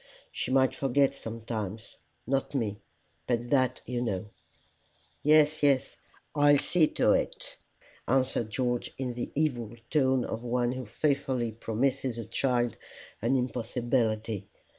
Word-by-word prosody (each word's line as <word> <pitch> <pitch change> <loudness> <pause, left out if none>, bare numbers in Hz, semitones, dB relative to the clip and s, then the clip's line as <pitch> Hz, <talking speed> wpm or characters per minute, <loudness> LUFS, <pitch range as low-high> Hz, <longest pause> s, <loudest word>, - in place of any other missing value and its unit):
She - - -3
might 130 0 +4
forget 135 +1 +2
sometimes 110 -3 -6 0.3
not 135 +1 -1
me, 105 -6 -1 0.5
but 120 0 -1
that, 130 -3 +2
you 120 -1 -2
know." 105 -3 -2 0.9
"Yes, 155 +1 +5
yes, 140 -3 +2 0.4
I'll 145 -1 +5
see 155 +3 +3
to - - +2
it," - - -1 0.5
answered 130 -3 +1
George, 120 +2 -1
in 130 -2 -2
the 120 - -4
evil 120 -7 -1 0.2
tone 130 -4 +3
of 110 +2 -4
one 120 0 +1
who 130 -2 -5
faithfully 130 -2 0
promises 120 +3 -1
a 115 - -4
child 120 -4 0 0.4
an 120 +5 +2
impossibility. 115 -4 -1
125 Hz, 125 wpm, -29 LUFS, 115-135 Hz, 0.9 s, Yes